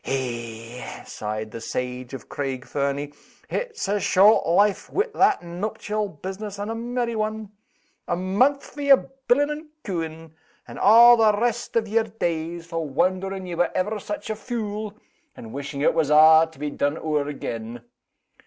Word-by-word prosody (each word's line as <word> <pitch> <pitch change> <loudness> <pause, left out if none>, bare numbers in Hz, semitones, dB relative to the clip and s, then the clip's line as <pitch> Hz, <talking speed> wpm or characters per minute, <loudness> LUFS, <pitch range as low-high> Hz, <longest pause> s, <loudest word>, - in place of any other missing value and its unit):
Eh!" 120 -2 -5
sighed 110 +1 -5
the 115 - -7
sage 125 +1 -4
of 130 - -10
Craig 135 -2 -4
Fernie, 140 +2 -2 0.4
"it's 470 - -3
a 205 +1 +1
short 200 +1 +5
life 200 +4 +2
wi' 415 - +1
that 400 - +3
nuptial 205 +4 -3
business, 195 +5 -7
and 205 +2 -4
a - - -2
merry 235 0 -2
one! 215 -1 -3 0.6
A - - 0
mouth 205 +11 +1
for 290 - -9
yer 275 -1 +4 0.2
billin' 290 +4 +3
and 305 +1 -6 0.2
cooin'; 165 -3 -5 0.3
and - - -9
a' 235 +3 +8
the 215 -2 +4
rest 240 0 -1
o' - - +4
yer 220 +1 0
days 165 0 -2
for 165 -1 -3
wondering 185 +5 0
ye 180 - -5
were 175 +1 +1
ever 210 +3 -1
such 205 +1 -5
a - - -2
fule, 215 -2 -4 0.4
and 110 -1 -10
wishing 140 +1 -5
it - - +3
was 160 -3 +1
a' 160 +1 +7
to 160 - -19
be 145 +1 -3
done 145 +2 -1
ower 150 -3 -1
again. 120 -4 -6
185 Hz, 165 wpm, -24 LUFS, 145-220 Hz, 0.6 s, a